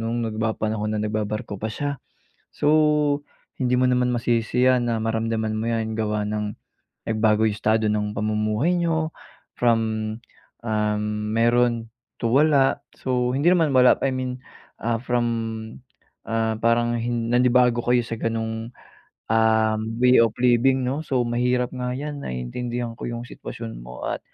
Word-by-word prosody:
nung 120 Hz, 0 st, -1 dB
nagpapanahon 110 Hz, -1 st, -2 dB
na 105 Hz, -, -1 dB
nagbabarko 105 Hz, -1 st, -3 dB
pa 110 Hz, -, -2 dB
siya. 140 Hz, +5 st, -4 dB, 0.5 s
So, 150 Hz, -1 st, +2 dB, 0.4 s
hindi 125 Hz, 0 st, +2 dB
mo 130 Hz, -, +3 dB
naman 125 Hz, 0 st, +2 dB
masisi 120 Hz, +1 st, +1 dB
'yan 125 Hz, -2 st, +3 dB
na 115 Hz, -, 0 dB
maramdaman 110 Hz, 0 st, -1 dB
mo 110 Hz, +2 st, -2 dB
'yan 110 Hz, -1 st, -1 dB
gawa 105 Hz, -1 st, -1 dB
ng 105 Hz, 0 st, -3 dB, 0.5 s
nagbago 110 Hz, 0 st, +3 dB
yung 105 Hz, -, -4 dB
estado 110 Hz, +1 st, +1 dB
ng 105 Hz, 0 st, -1 dB
pamumuhay 110 Hz, +10 st, 0 dB
niyo, 160 Hz, -2 st, 0 dB, 0.5 s
from, 115 Hz, -2 st, +3 dB, 0.8 s
ah, 105 Hz, -2 st, 0 dB, 0.3 s
meron 120 Hz, 0 st, +2 dB, 0.3 s
to 115 Hz, -, +1 dB
wala. 140 Hz, +1 st, +4 dB, 0.2 s
So, 125 Hz, -1 st, -1 dB
hindi 145 Hz, +6 st, +3 dB
naman 165 Hz, -5 st, +3 dB
wala, 125 Hz, -1 st, +6 dB
I 135 Hz, -, +1 dB
mean, 130 Hz, -1 st, -3 dB, 0.4 s
ah, 115 Hz, 0 st, -2 dB
from, 120 Hz, -1 st, 0 dB, 1.0 s
ah, 115 Hz, 0 st, -1 dB
parang 120 Hz, 0 st, +2 dB
hin 120 Hz, -1 st, -1 dB
nanibago 125 Hz, -1 st, +3 dB
kayo 120 Hz, +1 st, +3 dB
sa 115 Hz, -1 st, -3 dB
ganong, 115 Hz, 0 st, -3 dB, 0.6 s
um, 110 Hz, -1 st, +3 dB, 0.2 s
way 125 Hz, 0 st, +6 dB
of 115 Hz, -1 st, +3 dB
living, 125 Hz, +2 st, +3 dB
'no. 130 Hz, +4 st, -1 dB
So, 135 Hz, -5 st, 0 dB
mahirap 125 Hz, +1 st, 0 dB
nga 125 Hz, -1 st, -3 dB
'yan 145 Hz, +1 st, -5 dB
naiintindihan 120 Hz, -, -4 dB
ko -, -, -4 dB
yung 120 Hz, 0 st, -4 dB
sitwasyon 115 Hz, -, -8 dB
mo -, -, -10 dB
at -, -, -2 dB
115 Hz, 145 wpm, -23 LUFS, 110-125 Hz, 1.0 s, wala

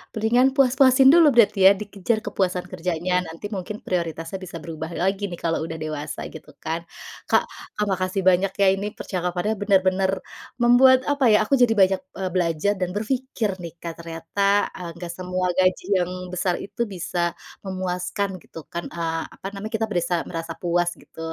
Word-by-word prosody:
mendingan 240 Hz, +5 st, +3 dB
puas-puasin 265 Hz, 0 st, +5 dB
dulu 335 Hz, -3 st, +7 dB
berarti 205 Hz, -4 st, +6 dB
ya, 195 Hz, -, +9 dB
dikejar 210 Hz, +2 st, -2 dB
kepuasan 185 Hz, -3 st, -1 dB
kerjanya. 180 Hz, +1 st, -1 dB
Nanti 165 Hz, +5 st, -7 dB
mungkin 200 Hz, +3 st, -5 dB
prioritasnya 170 Hz, 0 st, -3 dB
bisa 180 Hz, -2 st, -7 dB
berubah 160 Hz, -1 st, -6 dB
lagi 195 Hz, +2 st, 0 dB
nih, 175 Hz, -, -5 dB
kalau 165 Hz, -1 st, -1 dB
udah 160 Hz, 0 st, -5 dB
dewasa 155 Hz, -1 st, -5 dB
gitu 160 Hz, -, -11 dB
kan? 165 Hz, +1 st, -2 dB, 0.5 s
Kak -, -, +4 dB, 0.3 s
Kak 210 Hz, -, +1 dB
makasih 185 Hz, +1 st, -1 dB
banyak 185 Hz, +1 st, +4 dB
ya, 200 Hz, -1 st, +3 dB
ini 200 Hz, +2 st, -3 dB
percakapannya 180 Hz, +3 st, -2 dB
bener-bener 190 Hz, -1 st, +2 dB, 0.5 s
membuat 255 Hz, +2 st, +6 dB
apa 285 Hz, -4 st, +3 dB
ya, 215 Hz, 0 st, +4 dB
aku 275 Hz, -, -2 dB
jadi 240 Hz, -2 st, +5 dB
banyak, 190 Hz, 0 st, +4 dB, 0.2 s
eee, 190 Hz, -1 st, -2 dB
belajar 175 Hz, +2 st, +1 dB
dan 180 Hz, -2 st, -2 dB
berpikir 225 Hz, -2 st, -2 dB
nih, 170 Hz, -, -7 dB
Kak, 170 Hz, 0 st, -7 dB
ternyata, 195 Hz, +5 st, 0 dB
eee, 175 Hz, -2 st, -6 dB
nggak 170 Hz, 0 st, -6 dB
semua 185 Hz, 0 st, -2 dB
gaji 185 Hz, 0 st, +2 dB
yang 180 Hz, -1 st, 0 dB, 0.2 s
besar 180 Hz, 0 st, 0 dB
itu 220 Hz, -, -7 dB
bisa 175 Hz, -2 st, -2 dB, 0.3 s
memuaskan 185 Hz, +1 st, -3 dB
gitu 165 Hz, -, -11 dB
kan, 170 Hz, 0 st, -5 dB
eee, 165 Hz, -1 st, -2 dB
apa -, -, -8 dB
namanya, 210 Hz, +2 st, -6 dB
kita 225 Hz, -, 0 dB
berasa 175 Hz, -2 st, 0 dB, 0.3 s
puas 175 Hz, 0 st, +1 dB
gitu. -, -, -17 dB
185 Hz, 165 wpm, -23 LUFS, 175-205 Hz, 0.5 s, ya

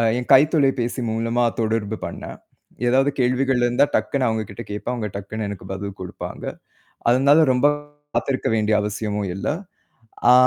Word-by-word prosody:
அ -, -, +2 dB, 0.2 s
என் 125 Hz, -, -5 dB
கைத்தொலைபேசி 135 Hz, -4 st, +4 dB
மூலமா 115 Hz, +2 st, 0 dB, 0.2 s
தொடர்பு 110 Hz, -1 st, -1 dB
பண்னேன். -, -, -7 dB, 0.5 s
ஏதாவது 135 Hz, +3 st, +4 dB
கேள்விகள் 130 Hz, 0 st, +2 dB
இருந்தா 120 Hz, +3 st, +4 dB
டக்குனு 135 Hz, -2 st, +1 dB
அவங்ககிட்ட 110 Hz, +1 st, -3 dB
கேட்பேன். 105 Hz, +4 st, -3 dB
அவங்க 110 Hz, -3 st, -3 dB
டக்குன்னு 105 Hz, +2 st, -4 dB
எனக்கு 100 Hz, -2 st, -7 dB
பதில் 100 Hz, +1 st, -5 dB
குடுப்பாங்க. 90 Hz, -, -7 dB, 0.7 s
அதனால 140 Hz, +6 st, +5 dB
ரொம்ப 125 Hz, +3 st, +4 dB, 0.5 s
காத்திருக்க 135 Hz, -2 st, 0 dB
வேண்டிய 110 Hz, -1 st, +2 dB
அவசியமும் 105 Hz, -1 st, -2 dB
இல்ல. 100 Hz, -, -4 dB, 0.8 s
ஆ -, -, +9 dB
115 Hz, 140 wpm, -22 LUFS, 105-130 Hz, 0.8 s, ஆ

